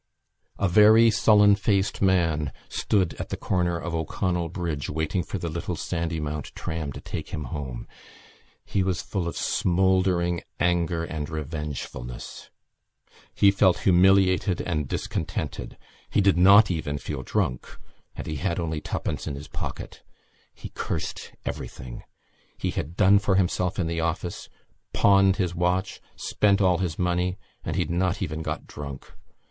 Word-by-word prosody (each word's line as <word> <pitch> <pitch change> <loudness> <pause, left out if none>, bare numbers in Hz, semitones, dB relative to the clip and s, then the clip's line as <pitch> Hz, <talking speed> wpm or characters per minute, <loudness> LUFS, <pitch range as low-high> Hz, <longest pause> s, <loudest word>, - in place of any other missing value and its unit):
A 100 - +1
very 110 +4 +7
sullen 105 -1 +5
faced 100 0 0
man 80 -6 +2 0.2
stood 95 -7 +1
at - - -5
the - - -3
corner 90 -2 0
of 85 0 -5
O'Connell 85 +1 -1
Bridge 80 -5 -3
waiting 80 +4 -1
for 100 - -4
the 85 - -4
little 85 +1 -3
Sandymount 80 -3 -3
tram 80 -3 -4
to - - -8
take - - -6
him 75 - -4
home. 65 -5 -5 0.8
He 100 - 0
was 95 -1 -1
full 95 -4 -3
of 85 - -4
smouldering 90 -1 +2 0.2
anger 85 -1 +1
and 80 -3 -4
revengefulness. 75 -5 -6 0.9
He 100 - +6
felt 95 -2 +3
humiliated 95 0 +4
and 75 -5 -2
discontented; - - -4 0.3
he - - +1
did 100 -1 +4
not 100 +3 +7
even 75 -4 -2
feel - - -5
drunk; 60 - -2 0.4
and - - -6
he 75 - -4
had 85 +2 -1
only 80 -2 -2
twopence - - -3
in 70 - -3
his 70 +2 -9
pocket. - - -6 0.5
He - - -10
cursed - - -4
everything. 60 -1 -6 0.6
He - - -2
had 80 +4 -5
done 100 0 +6
for 100 -1 +1
himself 90 -1 +1
in 90 - 0
the 85 0 -2
office, 85 +1 -3 0.4
pawned 95 -1 +5
his 90 -4 -1
watch, 90 +2 -1
spent 100 -1 +2
all 90 -3 +3
his 85 -5 -2
money; 90 +1 0 0.3
and - - -3
he - - +2
had - - -6
not 90 +1 0
even 80 +1 -4
got - - -4
drunk. 70 -2 -9
90 Hz, 150 wpm, -25 LUFS, 80-95 Hz, 0.9 s, very